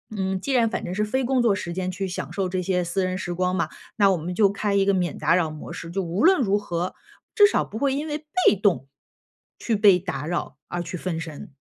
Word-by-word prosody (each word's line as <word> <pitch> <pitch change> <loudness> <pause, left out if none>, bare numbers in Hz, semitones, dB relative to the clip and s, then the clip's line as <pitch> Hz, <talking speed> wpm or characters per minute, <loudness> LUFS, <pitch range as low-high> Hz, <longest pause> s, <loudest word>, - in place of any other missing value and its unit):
嗯， 190 -1 -1
既 275 - -2
然 240 -3 +4
反 - - -3
正 180 - -4
是 210 +2 +1
非 260 +5 -1
工 260 +1 +1
作 225 -4 +4
时 185 -3 -4
间 185 +1 -2
去 190 +1 -3
享 180 - -5
受 195 -2 -1
这 185 0 -1
些 180 0 0
私 180 +2 -1
人 185 0 -2
时 175 -2 -4
光 180 +1 0
嘛， 170 - 0 0.3
那 200 -2 +5
我 185 - +1
们 170 +3 -4
就 200 +1 +4
开 200 0 -1
一 200 -1 +3
个 200 - +3
免 180 -2 -1
打 170 - +3
扰 165 -4 +1
模 155 - -9
式， 170 - -7
就 195 +2 -1
无 180 +4 -2
论 375 -2 +5
如 205 -4 +2
何， 180 -3 -3 0.4
至 415 - +8
少 410 - +2
不 215 - -8
会 275 +2 +1
因 290 +3 -2
为 295 -1 -2 0.3
被 - - +6
动 185 - +1 0.7
去 230 - 0
被 200 -3 +6
打 170 -6 -4
扰 175 +2 -3
而 175 - -2
去 175 +1 -5
分 170 -1 -3
神。 155 -3 -8
190 Hz, 280 characters per minute, -24 LUFS, 175-210 Hz, 0.7 s, 至